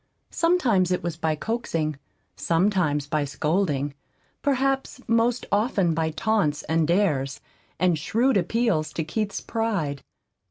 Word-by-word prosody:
Sometimes 255 - +2
it 180 - 0
was 170 -2 -2
by 160 -1 0
coaxing, 165 -6 -2 0.4
sometimes 165 -5 +1
by 150 +1 0
scolding; 145 0 0 0.5
perhaps 270 -1 0
most 230 +1 +2
often 200 -5 +2
by 160 0 0
taunts 165 -2 0
and 160 -1 +1
dares, 155 -7 +1 0.4
and 175 -2 +2
shrewd 245 - +1
appeals 185 -5 +1
to 165 - -2
Keith's 200 +6 -3
pride. 195 -12 -2
180 Hz, 120 wpm, -25 LUFS, 155-225 Hz, 0.5 s, Sometimes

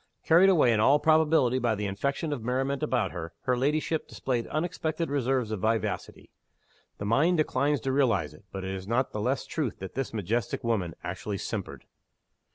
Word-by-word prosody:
Carried 175 +4 +6
away, 150 -10 +5
in 105 - +1
all 135 +7 +5
probability, 155 -5 +3
by 120 -3 +1
the 105 0 -3
infection 140 +10 -2
of 135 - -4
merriment 135 +3 -1
about 115 -6 0
her, 85 -2 -6
her 125 - +1
ladyship 150 +4 0
displayed 120 -3 -2
unexpected 160 -1 -2
reserves 130 -4 0
of 110 - -2
vivacity. 110 -1 -2 0.7
The 100 - -5
mind 150 - +3
declines 145 -2 +1
to 135 - -1
realize 115 - +1
it; 75 - -17
but 95 -1 -5
it 95 0 -3
is 95 0 -6
not 125 +4 +1
the 105 - -3
less 130 +5 0
true 150 -6 -1
that 95 -1 -8
this 135 -2 -3
majestic 110 +1 -2
woman 100 -8 -1
actually 95 +3 -4
simpered! - - -5
125 Hz, 180 wpm, -28 LUFS, 105-145 Hz, 0.7 s, Carried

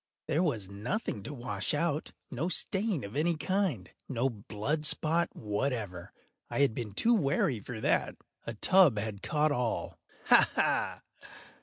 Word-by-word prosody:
There 155 +1 +1
was 115 - 0
nothing 105 - -3
to 140 - -6
wash 120 -2 -2
out—no 150 -1 -2
stain 190 - 0
of 100 +4 -8
any 165 +2 +1
kind—no 135 - -2
blood 110 +8 -3
spot 160 +2 +3
whatever. 105 -4 -3 0.4
I - - 0
had 140 -5 +3
been 110 -3 -5
too 235 - +3
wary 140 - +1
for 110 +2 -7
that. - - +1 0.3
A 115 - -4
tub 175 - +5
had 105 -1 -3
caught 150 0 +1
all—ha! 125 -4 +1
ha! - - +1
135 Hz, 135 wpm, -30 LUFS, 105-160 Hz, 0.4 s, tub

